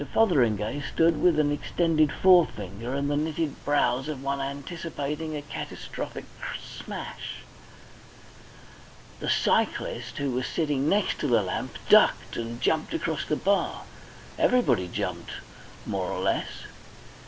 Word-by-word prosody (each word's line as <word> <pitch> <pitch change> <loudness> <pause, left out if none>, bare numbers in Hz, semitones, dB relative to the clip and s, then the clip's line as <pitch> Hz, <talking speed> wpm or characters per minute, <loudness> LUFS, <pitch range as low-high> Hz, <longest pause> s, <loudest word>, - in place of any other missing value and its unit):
Fotheringay 125 - +3
stood 165 +2 +2
with 175 -3 +4
an 150 -1 +3
extended 155 0 +2
forefinger 130 - +3
and 140 0 0
the 145 - +1
knitted 155 +1 -2
brows 135 -2 +2
of 145 -4 -5
one 140 0 -1
anticipating 150 +1 -4
a 145 - -6
catastrophic 145 - -6 0.3
smash. - - -7 1.8
The - - -3
cyclist, - - +1
who 140 -2 -1
was 125 +1 -1
sitting 145 -3 0
next 205 0 +1
the 150 - 0
lamp, 110 -7 0
ducked - - +5
and 115 0 -4
jumped 155 +5 0
across 155 -3 -2
the 150 - 0
bar. 200 +5 0 0.6
Everybody 245 - +3
jumped, - - -4 0.5
more - - -2
or - - -3
less. - - +1
145 Hz, 120 wpm, -27 LUFS, 130-160 Hz, 1.8 s, ducked